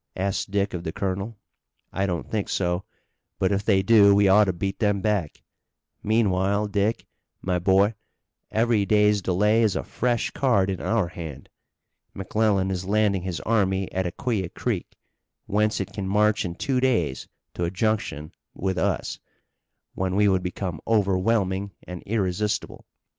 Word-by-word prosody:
asked 95 +1 -2
Dick 100 0 0
of 85 -1 -4
the 80 - -3
colonel. 100 +5 -3 0.6
"I 95 +1 0
don't 85 -3 -3
think 105 -3 -2
so, 90 0 -1 0.5
but 95 - +1
if 100 0 0
they 100 -3 +3
do 100 -2 +6
we 100 0 +4
ought 105 +2 +6
to 95 - +1
beat 95 +2 -4
them 105 -2 +1
back. 100 -6 -1 0.6
Meanwhile, 100 -1 +1
Dick, 105 +2 0 0.4
my 90 -1 0
boy, 95 +4 +3 0.6
every 115 -2 +2
day's 105 0 +3
delay 105 +5 +2
is 110 -4 +2
a - - -2
fresh 120 -1 -1
card 100 -8 +2
in 95 - -4
our 110 -6 0
hand. 80 -7 -8 0.7
McClellan 100 -1 +1
is 90 -1 -3
landing 100 -1 +2
his 85 -4 -4
army 95 -3 0
at 95 -1 -1
Aquia 95 0 -2
Creek, - - -4 0.5
whence 105 +1 +1
it - - -4
can 100 -2 -4
march 105 +1 +2
in 85 -1 -4
two 130 +7 0
days 115 - 0 0.3
to 90 - -2
a - - -1
junction 95 -6 -2 0.2
with 95 0 -2
us, - - -1 0.7
when 95 0 -2
we 105 +1 +4
would 95 -2 +2
become 90 -2 -4
overwhelming 100 -2 +1
and 90 -1 -7
irresistible. 105 -1 -2
100 Hz, 155 wpm, -25 LUFS, 95-105 Hz, 0.7 s, do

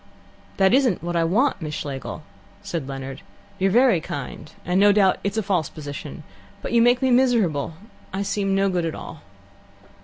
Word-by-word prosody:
"That 190 +2 +4
isn't 250 - +2
what 175 0 -3
I 165 - +3
want, 220 +9 +1
Miss 150 -1 -4
Schlegel," 140 -4 -5 0.4
said 160 -6 -4
Leonard. 135 0 -6 0.4
"You're 190 +1 +3
very 235 -4 +4
kind, 145 +1 -7
and 180 +2 +1
no 205 +1 +6
doubt 200 -2 +3
it's 200 +2 -2
a 220 - +1
false 180 -6 0
position, 145 -3 -8 0.4
but - - -4
you 235 - +4
make 245 +2 +4
me 260 - +3
miserable. 220 - +2 0.4
I 195 +1 -2
seem 195 -1 0
no 195 0 +2
good 180 -3 0
at 160 - -4
all." 155 - -9
190 Hz, 180 wpm, -23 LUFS, 155-215 Hz, 0.4 s, no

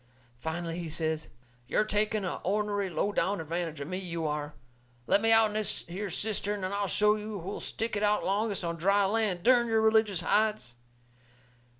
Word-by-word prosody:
Finally 165 +3 -4
he 170 -2 -5
says: 160 0 -2 0.4
"You're 175 - +2
taking 215 -1 0
a 180 - -3
ornery, 205 0 -1
low 195 +4 -1
down 200 -1 0
advantage 165 -1 -4
o' 140 - -4
me, 185 +4 -4
you 170 -3 -4
are. 150 -1 -3 0.5
Let 200 - +3
me 225 0 +3
out'n 225 -1 +5
this 215 -1 -1
here 195 +4 -5
cistern 205 +1 0
and 185 +1 -2
I'll 200 0 -1
show 210 +2 +3
you 210 -2 -6
who'll 190 +4 -5
stick 225 0 -1
it 205 - -1
out 210 0 +2
longest 200 0 0
on 170 -1 -3
dry 195 +4 +3
land, 200 -4 0
dern 240 0 +5
your 225 -1 +2
religious 220 -4 +3
hides!" 210 - +1
200 Hz, 185 wpm, -29 LUFS, 170-215 Hz, 0.5 s, out'n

